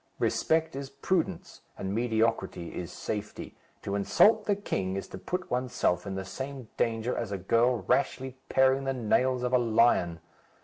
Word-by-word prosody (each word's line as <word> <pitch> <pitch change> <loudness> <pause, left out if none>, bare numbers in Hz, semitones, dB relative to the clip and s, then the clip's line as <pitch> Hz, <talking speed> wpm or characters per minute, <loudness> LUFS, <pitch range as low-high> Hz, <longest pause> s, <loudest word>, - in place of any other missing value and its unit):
Respect 160 -2 +1
is 135 0 -5
prudence, 175 +5 -2 0.2
and 95 +1 -3
mediocrity 110 -6 0
is 90 0 -5
safety. 105 0 -5 0.3
To 100 - -3
insult 210 - +4
the 205 - +3
king 95 - -2
is 95 - -4
to 95 - -8
put 180 - -4
oneself 120 -7 0
in 95 - -3
the 95 0 -4
same 130 +1 -6
danger 115 +1 0
as 115 -4 -3
a 100 - -1
girl 115 +4 +2
rashly 130 +7 0
paring 130 +1 +3
the 135 - 0
nails 125 +1 +1
of 125 0 -1
a 125 - +6
lion. 110 -7 +3
120 Hz, 165 wpm, -29 LUFS, 100-135 Hz, 0.3 s, a